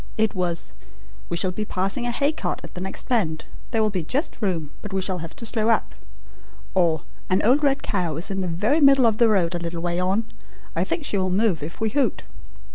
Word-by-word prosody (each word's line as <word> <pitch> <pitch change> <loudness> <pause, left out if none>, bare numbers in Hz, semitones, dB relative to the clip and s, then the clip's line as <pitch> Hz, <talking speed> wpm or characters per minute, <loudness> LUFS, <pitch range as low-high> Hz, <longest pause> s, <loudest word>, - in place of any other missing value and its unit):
It 220 -1 +2
was: 175 -3 -1 0.6
'We 170 - -1
shall 185 +2 +1
be 215 +4 -3
passing 195 +5 -1
a - - 0
hay 280 +5 +2
cart 315 - -3
at - - -10
the 180 - -6
next 190 +1 -4
bend; 170 -11 0 0.2
there 225 -2 +2
will 215 - +2
be 185 -4 -2
just 275 - -1
room, 165 -8 -1
but 210 - -7
we 190 - 0
shall 185 -1 -1
have 165 0 -7
to 230 - -6
slow 220 0 +1
up'; 225 - +2 0.8
or, 170 -5 +2 0.3
'An 185 +1 +2
old 255 +7 +4
red 275 -2 +2
cow 175 -6 -1
is 170 +5 -2
in 195 0 -1
the 185 - -1
very 210 - +1
middle 275 -3 +7
of 220 -2 +3
the 235 -2 +6
road 185 -5 +2
a 175 - -1
little 170 0 -4
way 175 0 0
on. 190 +5 +1 0.5
I - - +2
think 310 - -2
she 200 - 0
will 185 0 +1
move 190 -3 +2
if 155 +3 -7
we 220 -1 0
hoot.' 280 +3 +1
195 Hz, 235 wpm, -24 LUFS, 175-230 Hz, 0.8 s, middle